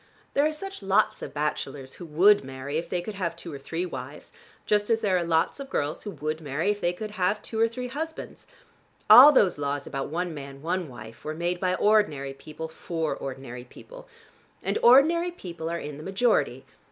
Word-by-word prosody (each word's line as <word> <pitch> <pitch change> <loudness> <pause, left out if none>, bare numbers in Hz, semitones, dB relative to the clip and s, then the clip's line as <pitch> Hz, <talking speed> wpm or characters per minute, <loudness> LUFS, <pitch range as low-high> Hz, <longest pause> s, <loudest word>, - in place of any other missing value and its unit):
There 285 +2 +3
are - - -1
such 390 - -7
lots 200 +2 +2
of - - -6
bachelors 145 -3 -3
who 175 - -7
would 185 +6 +5
marry 135 +3 -4
if 165 - -7
they 175 -1 -2
could 215 - -6
have 180 -4 -3
two 170 -1 -9
or 140 - -7
three 165 +6 -3
wives, 135 -3 -8 0.3
just 210 0 +1
as 225 -1 +2
there 195 -3 +2
are - - +3
such 170 - -3
lots 165 - +1
of 275 -1 -7
girls 145 - -2
who 210 - -5
would 155 -3 -4
marry 155 +6 0
if 205 - -5
they 175 - +2
could 210 +4 -6
have 205 +1 0
two 220 - -5
or 225 - +5
three 250 +2 -5
husbands. 315 +5 -6 0.6
All 275 +4 +12
those 195 - +3
laws 145 0 -2
about 135 -1 -4
'one 175 +2 -2
man, 140 -1 -9
one 175 -1 -2
wife' 115 -1 -11
were 155 0 -4
made 175 +2 -2
by 185 0 +1
ordinary 155 -11 +2
people 155 +3 -8
for 160 0 -3
ordinary 130 -2 -7
people. - - -14 0.6
And - - -1
ordinary 320 +8 +6
people 170 - -7
are 170 - -2
in 150 -3 -7
the 150 - -9
majority. 200 +7 +1
170 Hz, 210 wpm, -26 LUFS, 145-210 Hz, 0.6 s, All